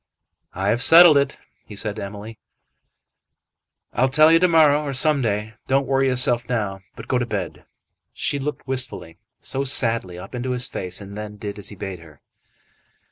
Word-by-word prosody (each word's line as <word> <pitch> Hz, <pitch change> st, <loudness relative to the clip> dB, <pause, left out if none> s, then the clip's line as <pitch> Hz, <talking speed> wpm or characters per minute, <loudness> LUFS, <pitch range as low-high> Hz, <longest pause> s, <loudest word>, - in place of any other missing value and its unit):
"I 95 Hz, +2 st, -1 dB
have 120 Hz, +3 st, +1 dB
settled 165 Hz, +3 st, +8 dB
it," 140 Hz, -1 st, +1 dB, 0.3 s
he 105 Hz, -, -12 dB
said 105 Hz, +1 st, -4 dB
to -, -, -5 dB
Emily. 105 Hz, +3 st, -9 dB, 1.5 s
"I'll 130 Hz, +2 st, +1 dB
tell 155 Hz, +4 st, +5 dB
you 165 Hz, -, +5 dB
to 180 Hz, -, +4 dB
morrow, 155 Hz, -3 st, +4 dB
or 140 Hz, -2 st, -4 dB
some 140 Hz, +2 st, +3 dB
day. 110 Hz, -1 st, -2 dB
Don't 135 Hz, +1 st, +1 dB
worry 135 Hz, 0 st, +1 dB
yourself 125 Hz, -2 st, +2 dB
now, 100 Hz, -5 st, -2 dB
but -, -, -11 dB
go 125 Hz, -, 0 dB
to 120 Hz, -, -1 dB
bed." 100 Hz, -6 st, -5 dB, 0.5 s
She 140 Hz, -, -3 dB
looked 145 Hz, 0 st, -5 dB
wistfully, 125 Hz, -10 st, -3 dB, 0.2 s
so 135 Hz, +1 st, -3 dB
sadly, 115 Hz, -9 st, 0 dB
up 90 Hz, -, -11 dB
into 125 Hz, +1 st, -3 dB
his 125 Hz, 0 st, +1 dB
face, 90 Hz, +2 st, -4 dB
and 100 Hz, 0 st, -10 dB
then 105 Hz, 0 st, -8 dB
did 105 Hz, 0 st, -7 dB
as 100 Hz, -, -3 dB
he 105 Hz, -, -11 dB
bade 95 Hz, -2 st, -7 dB
her. 80 Hz, -3 st, -17 dB
120 Hz, 185 wpm, -21 LUFS, 105-135 Hz, 1.5 s, settled